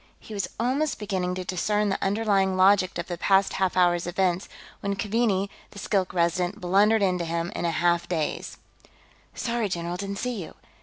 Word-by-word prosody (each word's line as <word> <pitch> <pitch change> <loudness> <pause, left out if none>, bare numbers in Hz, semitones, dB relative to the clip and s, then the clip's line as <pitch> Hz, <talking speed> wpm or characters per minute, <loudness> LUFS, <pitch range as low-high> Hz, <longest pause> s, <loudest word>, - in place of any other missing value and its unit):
He 220 - -11
was 200 -2 -2
almost 265 +5 0
beginning 185 -3 -2
to 185 - -4
discern 205 +3 0
the 195 - -2
underlying 195 -2 +1
logic 190 0 +4
of 170 - -3
the 175 -2 -5
past 195 +1 +3
half 190 -1 0
hour's 175 -1 +3
events 180 0 0 0.3
when 200 0 -2
Keaveney, 205 -2 +1 0.2
the - - -15
Skilk 195 -2 0
Resident, 175 +3 0
blundered 205 +4 +3
into 180 -2 +1
him 170 +1 -2
in - - -2
a - - +2
half 170 +1 +1
daze. 160 -4 -2 0.8
"Sorry, 235 -3 -1
general, 175 0 -3
didn't 200 +1 -4
see 245 -3 -3
you." - - -11
190 Hz, 175 wpm, -26 LUFS, 175-205 Hz, 0.8 s, logic